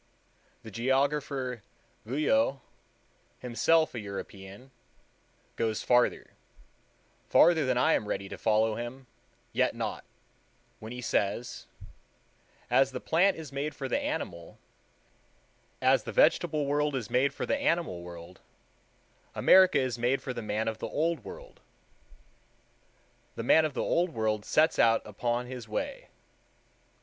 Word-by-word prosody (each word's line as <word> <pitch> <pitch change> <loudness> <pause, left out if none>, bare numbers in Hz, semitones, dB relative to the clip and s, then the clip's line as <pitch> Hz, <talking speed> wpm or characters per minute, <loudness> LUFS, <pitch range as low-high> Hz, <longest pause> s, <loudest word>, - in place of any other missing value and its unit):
The 110 - -10
geographer 135 +1 -1 0.5
Guyot, 150 - +2 0.8
himself 155 +7 +2
a 120 - -4
European, 100 +3 -9 0.9
goes 110 -2 -1
further—further 140 +5 0
than 130 -1 +1
I 125 - +3
am 105 - 0
ready 100 -1 -3
to - - -7
follow 110 0 +2
him; 120 +4 -7 0.5
yet - - +1
not - - -4 0.8
when 110 +1 -9
he 125 0 -6
says: 115 +1 -2 1.0
"As 135 0 +3
the 125 - -4
plant 180 +8 +2
is 155 -4 -8
made 145 +2 -3
for 135 - -4
the 280 - 0
animal, 295 +2 -5 1.3
as - - +4
the - - -7
vegetable 165 - +3
world 145 0 0
is 120 -5 -4
made 130 +2 +2
for - - -4
the 280 - 0
animal 170 - 0
world, 85 +1 -11 0.9
America 185 -4 +6
is 130 -3 -1
made 125 +3 +1
for 130 - -4
the 120 - -5
man 110 +1 -2
of 110 -1 -3
the - - -4
Old 165 +2 -1
World.... - - -11 1.8
The - - -4
man 160 - +5
of 150 -3 -4
the - - -1
Old 175 -4 0
World 110 -1 -1
sets 155 +1 +2
out 115 -1 +4
upon 120 +4 -2
his 125 -2 -8
way. 105 - -4
130 Hz, 130 wpm, -29 LUFS, 110-150 Hz, 1.8 s, America